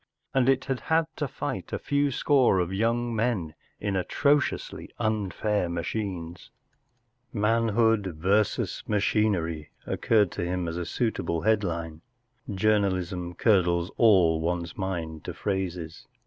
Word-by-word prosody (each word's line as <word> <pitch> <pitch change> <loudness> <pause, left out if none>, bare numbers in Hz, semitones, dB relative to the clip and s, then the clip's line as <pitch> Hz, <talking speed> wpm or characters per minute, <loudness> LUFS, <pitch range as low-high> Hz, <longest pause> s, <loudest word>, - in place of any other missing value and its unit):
And 130 -1 +3
it 135 -1 +2
had 135 -2 -2
had 160 0 +2
to 150 - -1
fight 130 - -5
a - - -1
few 145 0 +1
score 135 -4 +3
of 90 0 0
young 115 +3 0
men 110 -9 -1 0.3
in 100 -1 -2
atrociously 140 +10 0
unfair 105 -2 -1
machines! 85 -1 -4 0.8
“Manhood 110 -3 +2
versus 100 +6 +1
Machinery” 100 -7 0 0.2
occurred 105 -5 +2
to - - -4
him 90 0 -2
as 85 +1 -3
a 90 -1 -3
suitable 85 -5 -1
headline. 85 -6 0 0.5
Journalism 95 -3 0
curdles 90 -4 +2
all 90 -8 +5
one's 85 0 -2
mind 85 -5 -4
to - - -5
phrases. 90 -5 -4
100 Hz, 120 wpm, -27 LUFS, 85-115 Hz, 0.8 s, all